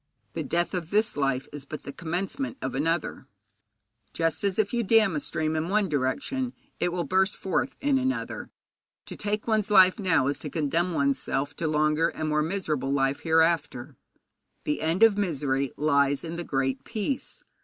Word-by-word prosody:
The - - -3
death 175 +1 -1
of 175 -3 -3
this 215 +3 +1
life 135 -2 0
is 145 -1 -6
but 150 +2 -8
the 140 - -7
commencement 190 - -3
of - - -4
another, 160 +4 -1 0.9
just 165 +1 0
as, 195 -2 0
if 215 0 +1
you 240 - +1
dam 220 -4 +4
a - - +1
stream 155 +2 -2
in 160 +2 -1
one 205 -1 +2
direction, 155 - -1 0.3
it 175 - +1
will 175 0 -1
burst 190 +3 +1
forth 195 +7 -1
in 280 -1 +2
another. 260 +1 -3 0.6
To - - -8
take 210 0 -2
one's 215 -2 +1
life 185 -1 +6
now 170 -9 +2
is 140 +1 -1
to 150 - -6
condemn 165 +4 0
one's 140 -2 +2
self 145 +2 -2
to 165 - -1
longer 155 +1 +2
and 155 -1 -3
more 150 0 +2
miserable 155 -5 -1
life 135 0 +1
hereafter. 160 -6 +1 0.7
The 150 - -1
end 165 +7 +2
of 215 -2 +6
misery 140 -7 0
lies 140 -2 +2
in 165 0 -5
the 175 - -4
Great 135 -2 -1
Peace. 230 +4 -3
165 Hz, 180 wpm, -27 LUFS, 145-200 Hz, 0.9 s, life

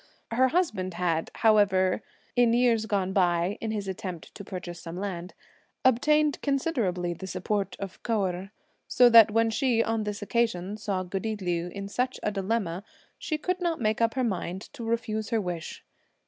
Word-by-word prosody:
Her 255 +3 +4
husband 215 - 0
had, 170 -2 0 0.2
however, 195 -3 +4 0.3
in 240 -2 +4
years 235 -2 +3
gone 190 -3 0
by 175 +1 +2
in 225 - -2
his 210 -2 -3
attempt 185 -3 -6
to 200 - -9
purchase 180 -2 -7
some 165 +1 -7
land, 185 -2 -5 0.5
obtained 300 +4 +3
considerably 230 - 0
the 190 +3 -8
support 195 +1 -2
of 195 -2 -7
Kou 220 -4 0
Erh, 185 +1 -4 0.4
so 245 -1 +6
that 230 -2 +9
when 225 +1 +2
she, 230 0 +2
on 225 -1 -1
this 210 0 -4
occasion, 205 -4 0
saw 200 -3 -2
goody 195 +4 -3
Liu 175 -3 -2
in 200 +2 -6
such 250 +5 -2
a 210 - +1
dilemma, 195 -3 -2 0.4
she 310 - -2
could 365 +4 -2
not 340 -2 0
make 215 -1 0
up 230 +1 +2
her 260 - +1
mind 190 -4 -2
to 260 -5 -8
refuse 225 -2 -2
her 225 - +1
wish. 175 -5 -5
210 Hz, 175 wpm, -27 LUFS, 185-230 Hz, 0.5 s, that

